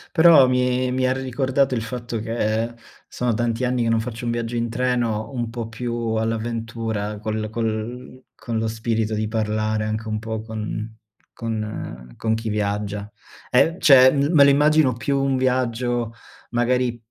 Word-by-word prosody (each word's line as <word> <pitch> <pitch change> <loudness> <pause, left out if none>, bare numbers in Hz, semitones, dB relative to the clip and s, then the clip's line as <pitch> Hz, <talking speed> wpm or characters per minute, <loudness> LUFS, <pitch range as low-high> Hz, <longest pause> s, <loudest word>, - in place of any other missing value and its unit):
Però, 160 -5 +7
mi 125 0 +1
mi 130 0 +1
ha - - +2
ricordato 130 0 0
il 115 - -1
fatto 120 0 -4
che, 115 0 -1 0.3
sono 125 -1 -1
tanti 115 +2 0
anni 125 -1 0
che 115 - +1
non 115 - +2
faccio 115 +1 -5
un 120 - -1
viaggio 120 0 -3
in 115 0 -1
treno, 120 -3 -1
un 120 -3 -2
po' 115 -1 -5
più 115 0 -3
all'avventura, 110 -1 -2
col 110 0 -3
col 115 +3 -4
con 115 -2 -4
lo 110 0 0
spirito 110 0 -1
di 110 0 -1
parlare, 110 0 -1
anche 110 +1 -3
un 110 - -1
po' 110 0 -4
con 110 0 -5 0.4
con 115 -2 -3
ehm, 60 - -7
con 110 -1 -1
chi 110 0 -3
viaggia. 105 -1 -2 0.4
E 165 +7 +4
cioè, 130 -2 +7
l 140 +1 +1
me 140 -3 +7
lo - - +6
immagino 150 -2 +4
più 135 +3 -1
un 135 -1 +1
viaggio, 120 -2 0 0.4
magari, 120 0 +1
115 Hz, 170 wpm, -22 LUFS, 110-125 Hz, 0.4 s, Però